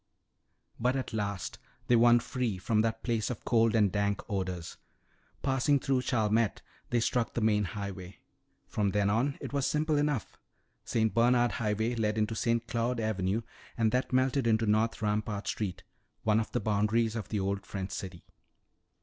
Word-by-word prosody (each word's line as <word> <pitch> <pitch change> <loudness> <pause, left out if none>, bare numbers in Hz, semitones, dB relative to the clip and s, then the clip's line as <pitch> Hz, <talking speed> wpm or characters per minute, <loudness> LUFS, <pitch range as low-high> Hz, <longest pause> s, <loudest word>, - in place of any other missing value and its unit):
But 125 +3 +1
at 130 -4 -3
last 100 -3 -3 0.3
they 120 - +4
won 120 +1 +6
free 125 -7 -2
from 110 +3 +1
that 115 0 -1
place 115 -3 0
of 125 - -6
cold 115 -1 +3
and 105 -4 +4
dank 100 0 0
odors. 95 -4 -3 0.7
Passing 135 +1 +3
through 135 -1 +1
Chalmette, 110 -3 +1 0.3
they 120 - +2
struck 115 +1 0
the - - +1
main 105 -1 +3
highway. 95 -2 -6 0.5
From 105 -2 0
then 100 -1 +2
on 130 +6 +1
it - - -7
was 140 -2 +1
simple 155 0 +1
enough. 145 -6 -1 0.5
St. 110 -1 +1
Bernard 120 +1 +4
Highway 110 +2 -1
led 110 -2 0
into 110 +1 0
St. 115 +1 0
Claude 115 +1 -1
Avenue 110 0 -1 0.3
and 110 -2 +2
that 125 0 0
melted 130 0 +2
into 115 0 +3
North 110 +1 +1
Rampart 105 -1 -1
street, 95 -3 -3 0.4
one 110 0 +3
of 110 - -3
the 120 - 0
boundaries 110 +2 +1
of 110 - -5
the 105 - -1
old 100 0 -1
French 95 -1 -5
city. 90 -3 -6
110 Hz, 165 wpm, -30 LUFS, 105-120 Hz, 0.7 s, won